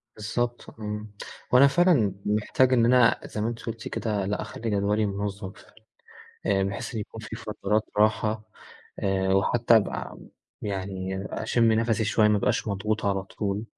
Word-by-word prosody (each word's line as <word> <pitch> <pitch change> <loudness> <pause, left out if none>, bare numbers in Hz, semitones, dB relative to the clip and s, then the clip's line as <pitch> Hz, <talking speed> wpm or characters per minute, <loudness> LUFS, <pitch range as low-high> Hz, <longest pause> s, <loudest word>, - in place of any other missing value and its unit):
بالضبط، 120 +3 -3
إمم 105 0 -5 0.4
وأنا 130 +3 +7
فعلًا 140 - +3
محتاج 105 +5 +2
إن 120 -2 +4
أنا 120 -1 +5
زي 105 - -5
ما 110 - 0
أنتِ 115 0 -4
قُلتِ 115 -1 -5
كده 105 -4 -2
لأ، 105 +2 -2
أخلي 115 - -5
جدولي 105 +1 +1
منظم، 100 -1 -4 1.0
آآ 95 - +2
بحيث 100 +5 -4
إن 110 - -2
يكون 110 +2 -8
في 110 0 -7
فترات 105 -1 -1
راحة، 110 +1 +1 0.5
آآ 95 -1 +1
وحتى 115 +4 +4
أبقى 110 - -2 0.4
يعني 95 -1 -4
أشم 115 0 +2
نفسي 115 -1 +1
شوية 105 0 +3
ما 105 - +3
أبقاش 105 - 0
مضغوط 105 +2 -1
على 95 -1 +1
طول، 100 +2 -3
105 Hz, 150 wpm, -26 LUFS, 100-115 Hz, 1.0 s, وأنا